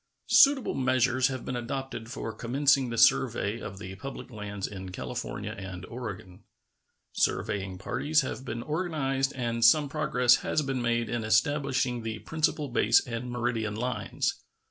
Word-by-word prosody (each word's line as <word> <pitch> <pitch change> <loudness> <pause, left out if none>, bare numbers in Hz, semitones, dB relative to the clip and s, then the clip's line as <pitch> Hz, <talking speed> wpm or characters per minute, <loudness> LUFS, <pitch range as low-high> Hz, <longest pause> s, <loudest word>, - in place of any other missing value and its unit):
Suitable 275 -3 +6
measures 130 -1 +2
have 130 -2 -5
been 125 - -3
adopted 120 -1 -4
for 115 - -5
commencing 135 +1 +2
the 115 - -4
survey 115 -3 +3
of 100 -3 -7
the 95 -1 -7
public 135 +3 -8
lands 105 -3 -5
in 95 -2 -7
California - - -5
and 95 -2 -7
Oregon. 100 -7 -8 0.7
Surveying 95 -2 -1
parties 150 - +1
have 130 -1 -5
been 120 -2 -5
organized 150 -5 -1
and 115 -2 -2
some 145 +6 +6
progress 125 -5 +3
has 155 - -1
been 135 -2 -2
made 120 -1 0
in 120 -1 -2
establishing 125 +2 +1
the 110 -1 -4
principal 155 +3 -1
base 115 -2 +4
and 120 0 -5
meridian 120 -3 -1
lines. 125 +3 -2
120 Hz, 145 wpm, -28 LUFS, 110-135 Hz, 0.7 s, Suitable